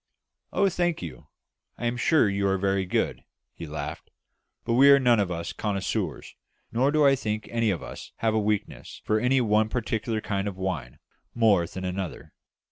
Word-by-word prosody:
"Oh, 200 - +3
thank 175 - 0
you. 85 - -9 0.5
I - - -4
am 120 +1 0
sure 130 0 +3
you 100 0 0
are 95 0 +2
very 95 0 0
good," - - -1 0.3
he 85 - -8
laughed; 75 -1 -6 0.6
"but 115 - 0
we 135 +4 +7
are 140 - +9
none 120 -4 +4
of 100 -3 +1
us 85 -1 -4
connoisseurs, 100 -3 -3 0.4
nor 130 +5 +2
do 155 -1 +3
I 135 -1 +6
think 110 -4 -3
any 115 -1 +1
of 95 -5 -2
us - - -9
have 110 -1 0
a 110 - +2
weakness 105 -1 -3
for 110 0 +2
any 125 +3 +3
one 110 -1 +2
particular 115 -1 -2
kind 100 -1 -2
of 95 -2 -5
wine 95 -9 -4 0.4
more 105 -7 +3
than 95 +2 -6
another. 90 -1 -5
105 Hz, 185 wpm, -26 LUFS, 95-120 Hz, 0.6 s, are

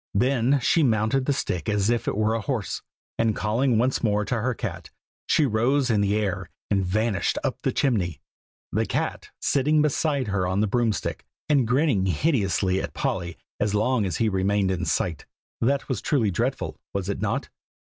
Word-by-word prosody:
Then 130 +4 +3
she 165 +7 +3
mounted 115 0 +2
the - - +3
stick 90 - -2
as 105 +1 +2
if 120 0 -1
it - - -1
were 110 +1 +2
a 115 - -1
horse, 120 -5 -3 0.4
and 115 -2 +2
calling 115 +3 +1
once 125 +3 +1
more 105 -2 +1
to 120 +1 -1
her 125 +1 0
cat, - - -5 0.4
she 155 - +3
rose 130 +3 +2
in 105 -2 +2
the 100 0 +2
air, 100 -4 -2 0.2
and 100 -2 +2
vanished 105 +2 0
up - - -2
the - - 0
chimney, 95 - 0 0.5
the - - 0
cat - - -2
sitting 150 +2 +2
beside 145 -4 0
her 95 -2 0
on 95 +2 0
the 105 - +3
broom 115 +2 +1
stick, 100 - -4 0.2
and 140 -6 +3
grinning 125 -6 +2
hideously 95 - +1
at - - -6
Polly 85 -2 -2 0.2
as 105 0 0
long 110 0 +2
as 85 - -2
he 115 - +2
remained 95 0 +1
in 90 -1 -2
sight. 85 -9 -1 0.3
That 135 +4 +1
was 130 - -2
truly 115 -9 +1
dreadful, - - -2
was 100 -2 -2
it 100 - -3
not? - - -1
110 Hz, 190 wpm, -25 LUFS, 100-130 Hz, 0.5 s, Then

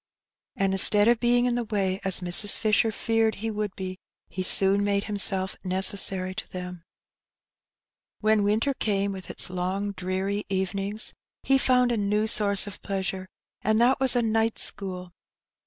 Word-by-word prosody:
^^ - - -67 0.5
And 195 -1 0
instead 205 +2 +6
of 235 -1 +3
being 245 0 +2
in 245 - 0
the 240 0 -1
way, 195 -4 -2
as 190 -1 +4
Mrs. 180 +4 +1
Fisher 220 0 +1
feared 225 0 0
he 225 +3 -4
would 210 -2 -4
be, 185 0 -7 0.3
he 185 - -5
soon 195 +2 +3
made 200 0 0
him 210 - -5
self 190 -1 0
necessary 185 0 +1
to - - -8
them. 180 -2 -8 1.4
When 215 -1 +2
winter 220 +7 +1
came, 200 -5 -1
with 190 -1 -9
its - - -6
long 185 +3 -3
dreary 195 +2 -3
evenings, 195 +2 -2 0.3
he 270 0 +3
found 250 -1 +2
a 235 - 0
new 210 +1 0
source 205 -2 +3
of 205 - -10
pleasure, 190 -1 -4 0.3
and 215 +1 +1
that 245 +3 +3
was 265 -1 +4
a 240 - +2
night 225 0 0
school. 180 -2 -5
200 Hz, 170 wpm, -25 LUFS, 190-220 Hz, 1.4 s, instead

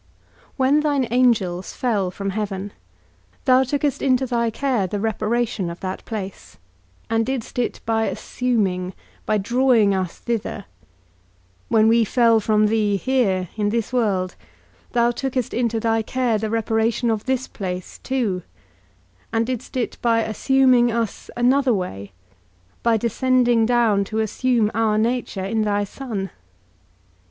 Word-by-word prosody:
When 270 +3 +3
thine 290 -4 +1
angels 210 -8 +1
fell 210 -7 0
from 195 +2 -4
heaven, 205 -1 -4 0.7
thou 255 -1 +5
tookest 280 +1 -1
into 260 -1 +2
thy 235 -2 0
care 235 -4 0
the 205 +3 -3
reparation 220 -2 -1
of 170 - -7
that 185 0 -4
place, 200 -4 -7 0.5
and 225 0 +1
didst 250 0 -4
it 240 - -2
by 225 0 +1
assuming, 190 -7 -1 0.3
by 215 - +2
drawing 235 -1 +3
us 185 -2 -2
thither; 220 -3 -3 1.0
when 220 -1 +4
we 230 +1 +5
fell 230 0 +4
from 215 0 +2
thee 210 -2 +2
here, 195 -7 0
in 210 -1 0
this 230 +2 -2
world, 195 -7 0 0.6
thou 240 0 +3
tookest 255 -1 -2
into 235 -2 0
thy 225 0 +1
care 235 -1 0
the 220 0 -2
reparation 225 +1 +1
of 220 -1 -2
this 260 0 -1
place 180 -3 -6
too, 230 -9 -1 0.9
and 225 0 +1
didst 255 +1 -4
it 245 - -2
by 230 -1 +3
assuming 250 +2 +3
us 230 -1 -3
another 255 0 +3
way, 100 - -5 0.7
by 230 -1 +3
descending 240 0 +2
down 230 -5 +3
to 215 +2 -5
assume 220 0 +1
our 220 -1 +1
nature, 225 -4 -1
in 220 +3 0
thy 205 -1 +1
Son. 205 -3 -5
225 Hz, 140 wpm, -22 LUFS, 205-245 Hz, 1.0 s, thou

